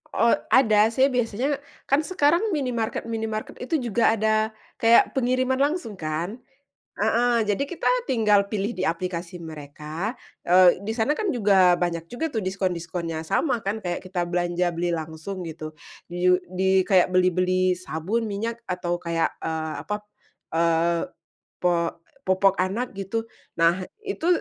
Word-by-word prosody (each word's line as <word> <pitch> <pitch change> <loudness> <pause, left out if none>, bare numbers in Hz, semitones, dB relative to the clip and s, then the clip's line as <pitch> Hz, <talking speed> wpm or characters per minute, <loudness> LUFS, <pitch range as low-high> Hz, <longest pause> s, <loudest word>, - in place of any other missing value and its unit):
Oh 230 0 +4 0.2
ada, 220 -4 +6
saya 265 +3 +4
biasanya 250 +4 0 0.3
kan 275 +2 +4
sekarang 355 +4 +2
minimarket-minimarket 225 -4 -3
itu 255 +6 -2
juga 225 +1 +3
ada 220 0 +2 0.4
kayak 230 +1 +5
pengiriman 255 +1 +1
langsung 280 - -1
kan. 165 +8 -3 0.6
Heeh, 235 -1 +2
jadi 210 +6 0
kita 345 - -3 0.2
tinggal 210 -4 +3
pilih 205 +1 -2
di - - -2
aplikasi 170 +1 -3
mereka, 155 - -6 0.3
eee, 180 0 +6
di 220 +3 -4
sana 245 +5 +1
kan 415 +7 -1
juga 195 - +4
banyak 170 -2 -2
juga 310 - -3
tuh 225 - -1
diskon-diskonnya, 175 -4 -3
sama 260 - +1
kan 205 +1 -3
kayak 175 -1 -2
kita 185 -1 -3
belanja 175 0 0
beli 170 0 -1
langsung 160 +4 -6
gitu, 155 -1 -7 0.3
ju 180 +1 +2
di 190 +1 +2
kayak 185 -2 +4
beli-beli 185 0 +2
sabun, 185 +6 -3
minyak, 225 +3 -4
atau 180 -4 -2
kayak, 170 -1 0 0.2
eee, 160 -1 -2
apa, 210 - -2 0.6
eee, 170 0 +2 0.6
po 170 -1 +1 0.3
popok 190 +1 +3
anak 200 +7 -1
gitu. 195 +3 -3 0.3
Nah 170 +2 +2 0.2
itu 395 -5 -3
190 Hz, 140 wpm, -24 LUFS, 175-230 Hz, 0.6 s, ada